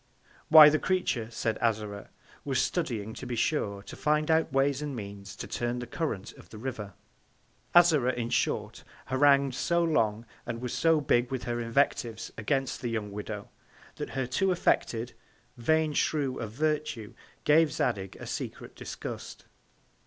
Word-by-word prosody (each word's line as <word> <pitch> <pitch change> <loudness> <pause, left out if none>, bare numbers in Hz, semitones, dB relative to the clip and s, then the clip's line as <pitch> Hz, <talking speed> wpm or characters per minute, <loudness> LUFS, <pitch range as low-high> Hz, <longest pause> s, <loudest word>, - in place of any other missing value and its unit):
Why, 155 -1 +11
the 155 +1 +1
Creature, 180 -12 0
said 110 -1 -2
Azora, 105 -3 -1 0.3
was 135 -3 0
studying, 115 - -1
to 125 - -8
be 120 - -3
sure, 100 -6 -1
to - - -10
find 150 +1 +1
out 160 0 +2
Ways 135 +1 +2
and 145 -2 -4
Means 100 -2 -8
to - - -6
turn 120 0 -2
the 125 - -4
Current 115 - -4
of - - -16
the 110 - -10
River. 110 -5 -5 0.8
Azora, 155 -8 +6
in 120 -1 -3
short, - - -1 0.3
harangu'd 140 0 +4
so 170 +6 +1
long, 115 -9 +1 0.2
and, 115 -1 -5
was 125 0 -4
so 165 -2 +3
big 120 -3 +2
with 130 -2 -3
her 120 0 -2
Invectives 115 -1 0
against 135 +4 -1
the 120 - -2
young 110 -3 -3
Widow, 105 0 -6 0.5
that - - -4
her 130 - +1
too 185 +10 +1
affected, 120 -8 0 0.4
vain 155 +5 +1
Shew 140 -4 0
of 105 - -5
Virtue, 150 -5 -2 0.3
gave 155 0 +5
Zadig 95 -9 -1
a - - -9
secret - - -6
Disgust. - - -7
125 Hz, 160 wpm, -29 LUFS, 110-150 Hz, 0.8 s, Why